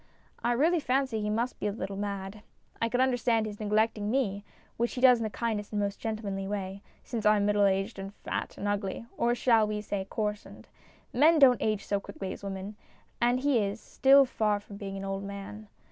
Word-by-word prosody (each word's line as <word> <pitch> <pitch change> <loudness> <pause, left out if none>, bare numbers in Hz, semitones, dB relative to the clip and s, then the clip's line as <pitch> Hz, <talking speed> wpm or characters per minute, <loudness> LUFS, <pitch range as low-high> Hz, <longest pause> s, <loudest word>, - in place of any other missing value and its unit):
I 240 - +2
really 325 +8 +3
fancy 260 -5 0
he 210 - -1
must 235 +4 -1
be - - -1
a - - 0
little 200 -1 -5
mad. 200 0 -4 0.4
I 230 - +1
could 250 +2 +1
understand 245 -3 +2
his 210 -1 -7
neglecting 215 0 +1
me, 210 -6 0 0.3
which 235 +1 -1
he - - -3
does 250 -2 +7
in - - -2
the 220 - -1
kindest 215 -2 -3
and 210 - 0
most 200 0 -2
gentle 220 -1 -4
manly 195 -1 -3
way, 195 -1 -4 0.2
since 230 -3 -4
I 210 0 +5
am 200 - +1
middle 205 0 +3
aged 195 +2 0
and 195 0 -6
fat - - -5
and 205 - -3
ugly 205 +1 -2
or 240 +1 +1
shall 230 -3 +3
we 210 0 -2
say 200 -2 -4
" - - -37
coarsened? 210 -1 -4 0.3
" - - -32
Men 310 +6 +5
don't 265 -4 +6
age 215 -2 0
so 200 - 0
quickly 195 -1 -6
as - - -11
women, 195 +1 -6 0.4
and 245 +1 +3
he 280 -3 +3
is 205 +1 -2
still 275 +3 +5
far 210 -4 0
from 205 0 -11
being 195 -1 -6
an 195 - -5
old 195 0 -3
man. 200 +2 -8
210 Hz, 220 wpm, -29 LUFS, 200-235 Hz, 0.4 s, does